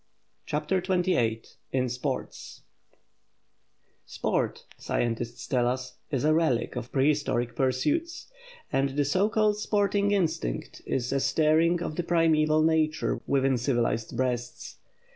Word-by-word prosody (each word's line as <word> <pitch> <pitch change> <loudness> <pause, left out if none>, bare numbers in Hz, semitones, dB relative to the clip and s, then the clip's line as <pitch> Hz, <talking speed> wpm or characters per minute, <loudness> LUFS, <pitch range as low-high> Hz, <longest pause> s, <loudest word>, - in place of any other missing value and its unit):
CHAPTER 150 +5 0
XXVIII 175 - +1 0.3
IN 130 -1 +1
SPORT 125 +2 -3 1.7
SPORT, - - -2
scientists 120 0 -2
tell 125 -3 +1
us, 125 0 -3
is 135 -3 -1
a 155 +1 +4
relic 155 -9 +1
of 125 0 -5
prehistoric 135 -4 +1
pursuits; 295 - 0 0.5
and 135 +1 0
the 145 - +2
so 185 +9 +2
called 215 -1 +2
sporting 205 -1 +1
instinct 160 - -1
is 125 0 -1
a 140 - +2
stirring 155 +5 +2
of 155 - -5
the 175 - 0
primeval 155 -2 +3
nature 160 -1 +1
within 135 -2 +2
civilized 120 -2 -1
breasts. 125 -1 -3
145 Hz, 120 wpm, -27 LUFS, 125-165 Hz, 1.7 s, a